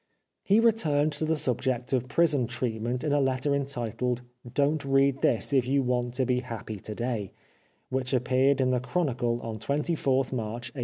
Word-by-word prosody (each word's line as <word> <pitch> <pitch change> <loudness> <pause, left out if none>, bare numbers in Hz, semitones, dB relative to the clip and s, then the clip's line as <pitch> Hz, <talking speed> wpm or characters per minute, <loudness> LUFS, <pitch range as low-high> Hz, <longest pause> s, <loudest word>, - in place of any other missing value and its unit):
He 205 +3 +3
returned 155 -11 +3
to 150 +2 -2
the 160 +1 +1
subject 125 -2 -1
of 125 -1 +1
prison 145 -3 +2
treatment 120 +1 -2
sn 150 - 0
a 145 - +3
letter 135 +1 +1
entitled 125 -3 -2 0.2
" 120 -1 -13
Don't 145 +2 +2
read 135 0 +2
this 120 +4 +2
if 130 -3 +3
you 135 +1 +2
want 125 -1 -1
to 130 0 +1
be 125 -1 +1
Happy 115 -4 -6
to 105 +2 -7
day/' 115 -5 -2 0.6
which 130 -1 -1
appeared 130 +2 +2
in 130 -1 +2
the 125 - +2
Chronicle 125 -3 -1
on 110 -1 -5
24th 140 +1 0
March 120 +1 -4
1898. - - -8
130 Hz, 185 wpm, -27 LUFS, 120-140 Hz, 0.6 s, He